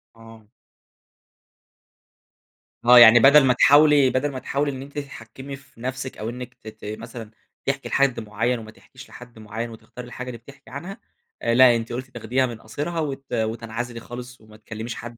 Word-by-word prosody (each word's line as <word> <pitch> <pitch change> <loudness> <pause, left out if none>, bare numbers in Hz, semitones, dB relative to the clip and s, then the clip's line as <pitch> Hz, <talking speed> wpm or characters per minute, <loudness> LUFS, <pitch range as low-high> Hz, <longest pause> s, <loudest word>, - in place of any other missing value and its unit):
آه. 115 -2 -16 2.4
آه. 125 0 +9
يعني 120 0 +9
بَدَل 140 +3 +7
ما 125 - +4
تحاولي 145 0 +5
بَدَل 140 +3 -1
ما 130 - -6
تحاولي 140 +2 -2
إن 130 0 -7
أنتِ 140 +1 -11
تتحكّمي 135 0 -9
في 135 -4 -19
نفسِك 130 +1 -5
أو 110 +2 -4
إنِّك 125 +1 -8
ت 110 - -18
ت 110 -1 -11
مثلًا 115 -1 -9 0.3
تحكي 135 0 -2
لحد 135 -3 +1
معيّن 115 +3 -2
وما 110 -1 -11
تحكيش 135 +4 -16
لحد 125 -2 -13
معيّن، 110 +2 -6
وتختاري 120 +2 -11
الحاجة 125 +1 -8
اللي 120 -2 -6
بتحكي 135 +4 -17
عنها 190 +10 -8 0.4
آآ 115 - 0
لأ، 125 -2 +7
أنتِ 115 0 -4
قُلتِ 130 +2 -5
تاخديها 120 +3 -1
من 120 -3 -7
قاصرها 150 +9 -4
وت 140 -3 -5
وتنعزلي 115 +1 -3
خالص 125 +1 -10
وما 110 0 -17
تكلّميش 110 +2 -7
حد 120 0 -9
125 Hz, 175 wpm, -23 LUFS, 115-135 Hz, 2.4 s, آه